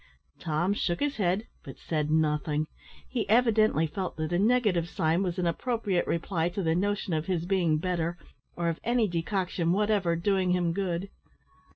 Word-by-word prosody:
Tom 170 +4 0
shook 175 -4 -1
his 290 -1 -1
head, 195 +2 +1 0.2
but 135 - -10
said 150 -2 -2
nothing. 150 -1 +1 0.4
He 240 -4 -3
evidently 220 -7 +4
felt 185 +4 -4
that 155 +2 -2
a 175 - +2
negative 205 -6 +2
sign 165 +2 +1
was 180 -2 -2
an 180 - 0
appropriate 200 0 0
reply 170 0 0
to 185 +2 -3
the 160 -1 +2
notion 200 +1 -1
of 155 0 -1
his 175 -3 -1
being 175 -4 +2
better, 175 0 -1 0.4
or 170 0 -1
of 165 -1 -1
any 235 -1 +2
decoction 175 -1 -1
whatever 205 -4 +2
doing 185 +1 +1
him 175 -2 +1
good. 190 0 -2
180 Hz, 170 wpm, -28 LUFS, 165-200 Hz, 0.4 s, evidently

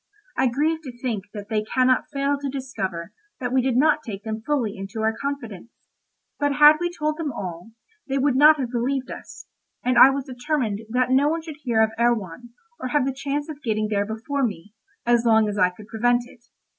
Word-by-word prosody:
I 265 - +2
grieve 305 +6 0
to 255 -5 -9
think 230 -6 -3
that 205 -1 -7
they 215 -2 +1
cannot 255 +3 +2
fail 280 +1 0
to 280 -1 -3
discover 205 -10 -5 0.3
that 245 -1 -3
we 260 - +4
did 250 -1 0
not 305 +2 +4
take 210 -7 -7
them 220 0 -4
fully 235 -5 -1
into 195 +3 -6
our 220 0 +1
confidence; 240 -8 -5 0.7
but 290 -1 +1
had 295 +1 +7
we 350 0 0
told 305 -3 -2
them 320 -4 -2
all, 185 -1 -7 0.3
they 270 0 -1
would 275 -1 +2
not 300 +2 +7
have 250 -3 -3
believed 260 +2 -1
us, - - -10 0.4
and 250 -1 +3
I 265 - +10
was 275 -1 -2
determined 250 -5 -2
that 250 +2 +1
no 275 +3 +4
one 325 +1 -2
should 315 -3 -8
hear 230 -5 +2
of 220 - +1
Erewhon, 235 -2 0 0.3
or - - -3
have 275 +1 +1
the 270 - -1
chance 280 +2 -3
of 300 -2 -8
getting 215 -4 -1
there 205 -1 0
before 225 +6 -3
me, 205 -3 -4 0.3
as 240 -1 +3
long 220 -2 +4
as 205 -1 -3
I 180 - +5
could 205 +3 -14
prevent 240 +2 +1
it. 240 -1 -18
250 Hz, 210 wpm, -23 LUFS, 220-280 Hz, 0.7 s, I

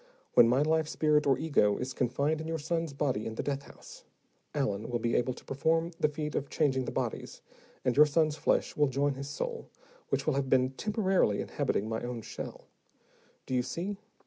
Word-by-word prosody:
When 115 - +8
my 130 +4 +3
life 160 0 +2
spirit, 150 -1 +2
or 135 - +4
ego, 125 -10 +2
is 125 +1 -4
confined 140 +6 0
in 160 - -5
your 165 0 -1
son's 165 +1 -2
body 135 -6 -1
in 110 - -5
the - - -3
death 140 -1 -2
house, - - -14 0.5
Allen 130 -9 -1
will 120 - 0
be 115 0 -1
able 125 +1 +1
to - - -14
perform 165 +4 +1
the 150 - +3
feat 150 0 -4
of 140 - -2
changing 130 -4 +1
the - - -3
bodies, - - -4 0.4
and 125 - +2
your 150 +2 +7
son's 155 0 +2
flesh - - +1
will 150 -1 +3
join 140 +2 +1
his 140 +1 -6
soul, 470 - -4 0.4
which - - 0
will 155 - +2
have 135 -1 -1
been 130 0 +3
temporarily 190 - +1
inhabiting 105 - -1
my 110 0 -2
own 120 -2 -5
shell. - - -7 0.8
Do - - -5
you 125 - +3
see? 175 +11 -4
140 Hz, 200 wpm, -30 LUFS, 125-155 Hz, 0.8 s, When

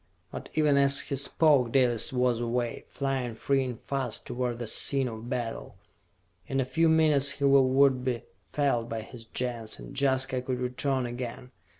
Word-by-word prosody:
But - - -8
even 150 -2 +3
as 140 0 +5
he 140 - -4
spoke, 140 -2 +3
Dalis 125 -4 +2
was 125 -2 +1
away, 120 0 -2
flying 135 -4 -3
free 135 +3 +1
and 125 -3 -5
fast 135 -5 -3
toward 120 -1 -3
the 120 - -5
scene 135 +4 +1
of 115 0 -7
battle. 115 - -4 0.7
In 135 - -1
a 135 - +1
few 165 +5 +2
minutes 150 -3 +3
his 140 - 0
will 135 -1 +5
would 130 -1 +3
be 125 -2 -2 0.3
felt 135 -5 0
by 115 -1 -3
his 115 +1 -12
Gens, 115 -1 -4
and - - -10
Jaska 130 -2 +1
could 125 0 -3
return 125 +1 -1
again. 125 +1 -6
130 Hz, 175 wpm, -28 LUFS, 120-140 Hz, 0.7 s, as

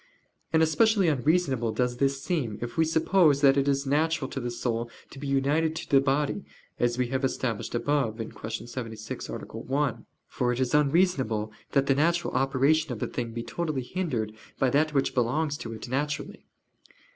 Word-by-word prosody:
And 160 0 +4
especially 195 +4 +3
unreasonable 140 -4 +1
does 125 +1 0
this 135 +1 0
seem 150 - -1
if 120 0 -5
we 160 - +3
suppose 160 -2 +3
that 135 -2 +6
it 140 0 +1
is 140 0 +1
natural 155 +1 +1
to - - -3
the 120 -1 -3
soul 120 -1 -2 0.2
to 135 - -10
be 140 - -5
united 145 +4 +1
to - - -5
the 135 -2 +5
body, 145 +7 0 0.4
as 120 0 +1
we 125 -1 0
have 130 +1 -1
established 125 -4 -2
above 130 -3 0
([Q. 110 0 -6
76], 115 -3 -6
A. - - -5
1): 140 -1 -3 0.2
for 125 -1 -1
it 125 - -2
is 130 -2 0
unreasonable 140 - +2 0.2
that 140 -1 +3
the 135 - +3
natural 170 +5 +1
operation 135 +4 +2
of 120 - -4
a - - +1
thing 120 -2 -4
be 115 0 -4
totally 155 -5 -3
hindered 125 - -2 0.2
by 130 -2 +2
that 150 +3 +2
which 135 - +2
belongs 140 +5 +1
to 115 - -7
it 110 +1 -7
naturally. 145 +4 -3
135 Hz, 180 wpm, -27 LUFS, 120-155 Hz, 0.4 s, that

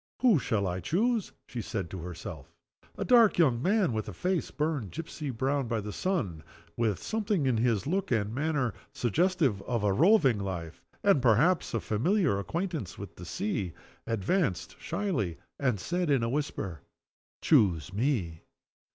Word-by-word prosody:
"Who 230 - +5
shall 110 -5 0
I 90 0 -2
choose?" 210 - 0
she 120 - -5
said 95 -5 -4
to 95 - -5
herself. 85 0 -8 0.5
A - - -2
dark 235 -4 +6
young 130 -9 +3
man 190 - +2
with 110 -1 -3
a - - -7
face 180 - -1
burned 150 - -2
gipsy 155 - -6
brown 135 +2 0
by 115 -1 -1
the 105 0 -5
sun; 110 - -1 0.3
with 110 -5 0
something 210 -8 0
in 130 -3 +2
his 115 -3 +1
look 190 +6 -1
and 110 -3 0
manner 140 -4 0 0.2
suggestive 145 - +1
of 115 0 -2
a 100 -2 +3
roving 150 - +5
life, 90 -4 -5 0.2
and 195 -9 +4
perhaps 130 - +3
of 115 - -1
a - - -17
familiar 155 - +2
acquaintance 165 - -3
with 100 -2 -8
the 90 - -9
sea 90 +1 -2 0.3
advanced 115 - 0
shyly, 105 - -2 0.2
and 125 -7 +1
said, 175 - -1
in 135 -5 +3
a 115 - 0
whisper: 110 - -3 0.6
"Choose 95 - +3
me!" 100 - -1
125 Hz, 160 wpm, -29 LUFS, -, 0.6 s, dark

